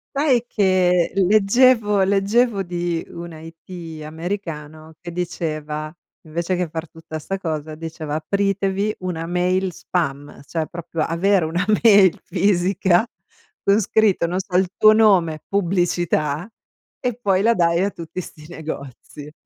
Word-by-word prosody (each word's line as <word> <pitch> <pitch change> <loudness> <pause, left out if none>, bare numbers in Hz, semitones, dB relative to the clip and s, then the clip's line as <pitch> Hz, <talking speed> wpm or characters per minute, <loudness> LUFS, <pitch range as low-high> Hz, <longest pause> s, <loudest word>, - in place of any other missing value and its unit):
Sai 275 -4 +2
che 185 -5 +2
leggevo 210 +2 +4
leggevo 200 +3 +2
di 175 -2 -2
una 170 -2 -8
IT 165 0 -10
americano 160 -2 -6
che 175 -1 -7
diceva 155 -3 -4 0.4
invece 170 +3 -2
che 180 -1 -1
far 160 +1 -5
tutta 160 -1 -8
sta 195 +5 -4
cosa, 155 -3 -4
diceva: 160 -1 -5
"Apritevi 195 +4 0
una 175 -3 -4
mail 180 +1 0
spam" 145 -6 -4
cioè 160 0 -3
proprio 165 -1 -6
avere 170 +2 +2
una 175 +4 -1 0.2
mail 200 -5 +6
fisica 190 +1 +2 0.6
con 200 +2 +4
scritto, 205 -3 +2
non 180 +2 -2
so, 190 -1 -6
il 190 - +2
tuo 215 - +7
nome, 190 -8 +3
pubblicità 175 -4 0 0.5
e 245 -3 -1
poi 200 -6 +1
la 230 +3 +3
dai 170 -2 +2
a 200 - +1
tutti 170 -1 -7
sti 155 -3 -11
negozi. 150 -2 -8
175 Hz, 135 wpm, -21 LUFS, 160-195 Hz, 0.6 s, tuo